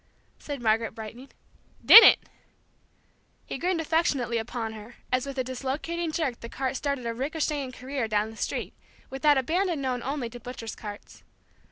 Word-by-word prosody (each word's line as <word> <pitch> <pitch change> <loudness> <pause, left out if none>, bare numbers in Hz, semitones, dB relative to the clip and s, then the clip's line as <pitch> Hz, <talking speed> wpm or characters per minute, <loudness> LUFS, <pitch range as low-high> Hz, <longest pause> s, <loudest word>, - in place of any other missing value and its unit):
said 285 -4 -6
Margaret, 220 0 +1
brightening. 230 +4 -9 0.6
"Didn't!" 455 - +11 1.3
He - - -6
grinned 360 +1 0
affectionately 290 -8 0
upon 225 0 -4
her 220 +2 -11 0.2
as 255 +2 0
with 275 -1 -6
a 260 - +1
dislocating 280 +6 -3
jerk 300 -7 -2
the 235 - -8
cart 265 +2 -3
started 280 -2 -2
a 230 - -2
ricochetting 285 +1 -2
career 255 -1 -4
down 215 0 0
the - - -13
street, - - -3 0.4
with 270 0 -6
that 295 -2 +5
abandon 340 +5 0
known 255 -2 -2
only 270 -1 -3
to 245 - -9
butchers' 235 -2 -7
carts. 205 -2 -10
260 Hz, 160 wpm, -27 LUFS, 235-290 Hz, 1.3 s, Didn't